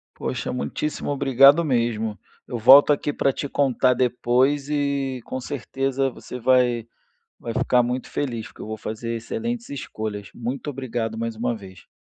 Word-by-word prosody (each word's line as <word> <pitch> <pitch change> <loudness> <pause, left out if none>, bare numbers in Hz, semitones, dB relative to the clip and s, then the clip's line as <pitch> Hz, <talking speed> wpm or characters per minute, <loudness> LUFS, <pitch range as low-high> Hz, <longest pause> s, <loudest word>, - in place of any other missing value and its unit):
Poxa, - - -3
muitíssimo 145 +5 -3
obrigado 140 +3 +5
mesmo. 115 -6 0 0.3
Eu 120 - -4
volto 135 +6 +8
aqui 145 0 0
para 135 - +2
te 140 - -4
contar 130 -2 +2
depois, 125 +3 +1
e 140 -3 -1
com 130 - -5
certeza 135 +1 -2
você 125 0 -9
vai 125 -2 +3 0.5
vai 115 - -5
ficar 130 -1 +3
muito 125 +1 -2
feliz, 120 -6 -3
porque - - -14
eu - - -7
vou 110 0 -5
fazer 115 +2 -4
excelentes 230 - -4
escolhas. 110 -6 -5
Muito 125 +5 -4
obrigado 120 -5 -3
mais 115 0 -3
uma 120 +1 -1
vez. 95 -3 -13
125 Hz, 155 wpm, -23 LUFS, 115-140 Hz, 0.5 s, volto